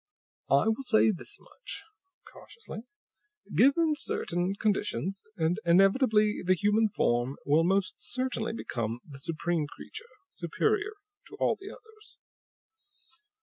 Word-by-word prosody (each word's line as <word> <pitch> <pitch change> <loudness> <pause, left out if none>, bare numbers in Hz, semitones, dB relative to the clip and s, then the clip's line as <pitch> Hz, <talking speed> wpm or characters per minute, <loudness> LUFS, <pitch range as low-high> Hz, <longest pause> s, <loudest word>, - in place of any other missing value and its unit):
"I - - +4
will 225 +4 +1
say 220 -4 +4
this 180 - -6
much," - - -9 0.5
cautiously. 460 - -10 0.7
"Given 310 +4 +4
certain 180 - -1
conditions, 200 -2 -1 0.2
and 165 +3 +1
inevitably 210 +4 +4
the 185 +1 +3
human 210 +4 +3
form 120 -6 0
will 150 +3 +4
most 190 +2 +1
certainly 255 -3 -2
become 115 - -3
the 140 -3 -11
supreme 165 +1 -1
creature, 445 - -10 0.2
superior 420 - 0 0.3
to - - -11
all - - +2
the 390 +1 -10
others. 440 0 -15
200 Hz, 115 wpm, -29 LUFS, 170-260 Hz, 0.7 s, I